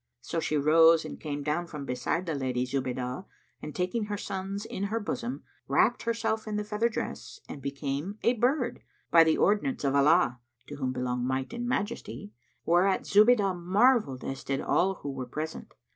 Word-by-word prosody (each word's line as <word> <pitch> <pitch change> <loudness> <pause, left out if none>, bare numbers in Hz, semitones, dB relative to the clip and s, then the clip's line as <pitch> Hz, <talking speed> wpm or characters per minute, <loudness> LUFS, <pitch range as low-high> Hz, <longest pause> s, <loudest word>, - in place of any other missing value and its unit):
So 165 - -3
she 155 -1 0
rose 160 +2 +5
and - - -7
came 145 -2 -4
down 155 +4 -1
from 150 -4 -7
beside 130 +8 -2
the 165 - -2
Lady 130 -3 -1
Zubaydah 130 +3 -3 0.3
and 150 - -7
taking 190 +5 -1
her 205 0 -3
sons 195 +1 -4
in 195 - -4
her 220 +3 -1
bosom, 235 +4 -4 0.2
wrapped - - +3
herself 230 -1 -1
in 215 - -3
the 210 - -1
feather 210 +3 0
dress 235 - -5
and 140 - -8
became 140 +7 -4
a 235 - +4
bird, 245 +1 0 0.3
by 165 -1 +8
the 160 -1 +2
ordinance 210 - +1
of 135 -1 +1
Allah 140 -2 +4 0.3
(to 145 - -8
whom 130 -2 -1
belong 125 -1 -2
Might 130 - -2
and 240 0 -3
Majesty!), 200 - -3 0.3
whereat 180 +3 +3
Zubaydah 210 -2 +5
marvelled 195 - +3
as 135 0 -5
did 135 0 -1
all 190 +2 +1
who 140 - -6
were 130 -2 -5
present. 155 +5 -6
165 Hz, 180 wpm, -28 LUFS, 140-210 Hz, 0.3 s, by